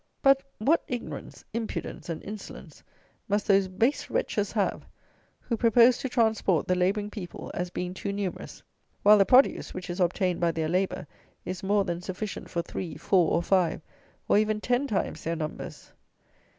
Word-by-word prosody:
But, 275 0 +6 0.2
what 290 +10 +3
ignorance, 245 -2 -6
impudence, 225 -5 -4
and 165 - -4
insolence 210 0 -9 0.5
must 205 +1 +1
those 195 -2 +4
base 225 +9 0
wretches - - -1
have, - - -1 0.5
who 235 - -2
propose 235 +2 +5
to 265 - -3
transport 220 -8 +2
the 185 - +3
labouring 200 +3 0
people, 185 -6 -7
as 180 0 -3
being 180 0 -4
too 200 +1 -4
numerous, 200 -2 -5 0.4
while 210 0 +8
the 195 - +4
produce, 260 +2 +4
which 185 -1 -5
is 175 - -5
obtained 180 0 +1
by 170 -1 +1
their 160 -1 -1
labour, 185 0 0 0.4
is 185 0 -4
more 200 +1 +2
than 175 -1 -3
sufficient 190 +3 -5
for 170 -1 -2
three, 175 0 -6
four, 180 -5 +3
or 170 - +2
five, 180 -2 +2 0.5
or - - +5
even 215 0 +1
ten 245 +5 0
times 210 - -2
their 165 +1 -1
numbers! 155 -1 -6
195 Hz, 165 wpm, -27 LUFS, 180-220 Hz, 0.5 s, while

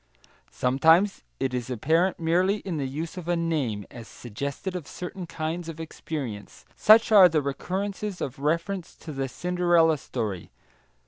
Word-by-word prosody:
Sometimes 160 +10 +3 0.2
it 130 -1 -1
is 125 -1 -3
apparent 165 - +1
merely 180 +4 +2
in 180 -5 -4
the 140 -2 -2
use 160 +7 -5
of 175 -2 -7
a 175 - +2
name, 145 - -1
as 115 -3 -10
suggestive 140 - -5
of 175 -6 -5
certain 180 0 -7
kinds 165 +1 -4
of 165 0 -8
experience; 140 -9 -6
such 220 +1 +6
are 195 -4 +9
the 155 -2 +2
recurrences 190 +7 -3
of 135 -1 -5
reference 170 +5 -2
to 160 - -9
the 135 -1 -2
Cinderella 175 -2 +2
story. 105 -10 -4
160 Hz, 150 wpm, -26 LUFS, 135-180 Hz, 0.2 s, are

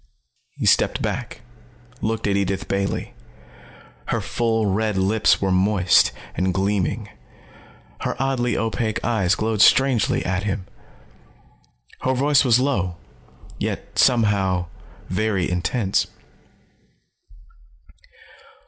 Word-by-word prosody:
He - - -4
stepped - - +3
back, - - -4 0.6
looked 110 +1 -2
at 100 - +1
Edith 100 -1 -1
Bailey. 100 0 -2 0.9
Her - - 0
full 115 -2 -1
red 105 +1 0
lips 100 +3 +2
were 95 -1 0
moist 95 0 +3 0.2
and 95 -1 -1
gleaming. 100 +1 -1 0.9
Her - - -3
oddly 130 -2 0
opaque 110 -1 -1
eyes 105 -5 +2
glowed 110 -1 -1
strangely 130 -2 +4
at 90 0 -1
him. 100 -2 -3 1.3
Her 130 0 0
voice 140 +2 +3
was 125 -2 +4
low, 95 -11 -1 0.6
yet - - -4
somehow, 100 -7 +2 0.4
very 100 -1 0
intense. 95 +4 0
105 Hz, 100 wpm, -22 LUFS, 95-115 Hz, 1.3 s, strangely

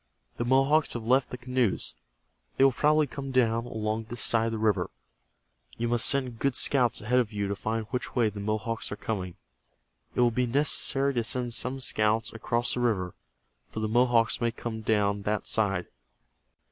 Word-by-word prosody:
The 120 - -2
Mohawks 135 +5 +3
have 120 - -5
left 130 +4 +2
the 125 - -6
canoes. 125 - -1 0.6
They - - +4
will 135 - +6
probably 150 +4 +3
come 140 0 -7
down 115 -2 +1
along 110 -1 -3
this 120 +2 -5
side 115 -1 +2
of - - -2
the - - -2
river. 110 -2 +1 0.9
You 120 0 -1
must 120 -1 +4
send 130 -4 +1
good 140 -3 0
scouts 125 -4 +3
ahead 125 +4 +2
of 120 -3 -1
you 100 -1 -2
to 100 - -2
find 110 +2 -3
which 125 - -4
way 120 -3 +3
the 105 0 -8
Mohawks 110 +2 -3
are - - -3
coming. 95 -5 -4 0.8
It - - +2
will 120 -1 +4
be 125 +2 0
necessary 140 +1 +1
to 120 -2 0
send 120 0 -1
some 130 +3 -2
scouts 110 -1 0
across 120 +1 -1
the - - -2
river, 100 -7 0 0.6
for - - -6
the 110 - -1
Mohawks 120 0 +2
may 120 - +2
come 115 -1 -6
down 105 -2 +1
that 105 +1 -2
side. 95 -5 +1
115 Hz, 185 wpm, -28 LUFS, 110-125 Hz, 0.9 s, will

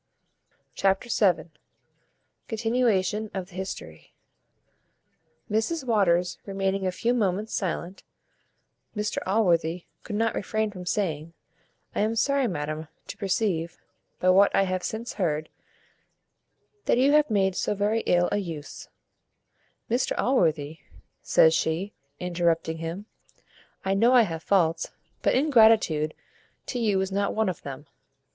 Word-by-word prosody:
Chapter 195 +5 +1 0.2
vii. 160 -1 -11 1.0
Continuation 220 -3 0
of 190 -1 -4
the - - -18
history. 190 +1 -7 1.3
Mrs 225 +9 -1
Waters 180 -6 +2
remaining 195 -1 -1
a - - 0
few 235 +6 0
moments 210 -2 -1
silent, 185 -1 -3 0.9
Mr 210 0 -1
Allworthy 175 -4 +1 0.2
could 210 - -6
not 225 +1 +1
refrain 215 +1 -1
from 180 -3 -9
saying, 165 -5 -2 0.6
"I - - -2
am 220 +2 +1
sorry, 275 +3 +2
madam, 155 -3 -4 0.2
to - - -7
perceive, 190 -4 -1 0.4
by 185 +1 +4
what 195 +2 +5
I 195 - +4
have 185 -1 -1
since 225 +5 -4
heard, 155 -6 -1 1.4
that - - +3
you 265 +3 +4
have 300 -1 +4
made 190 -3 +2
so 210 - -1
very 205 +3 +1
ill 175 0 +3
a - - +1
use 165 -7 -6 0.5
" - - -44
"Mr 245 +2 0
Allworthy," 160 - +1 0.4
says 160 - +5
she, 165 +6 -1 0.3
interrupting 170 -2 0
him, 165 +5 -5 0.8
"I 190 - +1
know 230 +6 +4
I 245 -2 +7
have 165 -6 -4
faults, 170 -3 +1 0.3
but - - +2
ingratitude 220 - +4 0.5
to 250 - -3
you 210 -4 +2
is 190 0 -2
not 200 +1 0
one 220 -2 +1
of 180 - -5
them. 140 +1 -8
195 Hz, 130 wpm, -26 LUFS, 170-220 Hz, 1.4 s, I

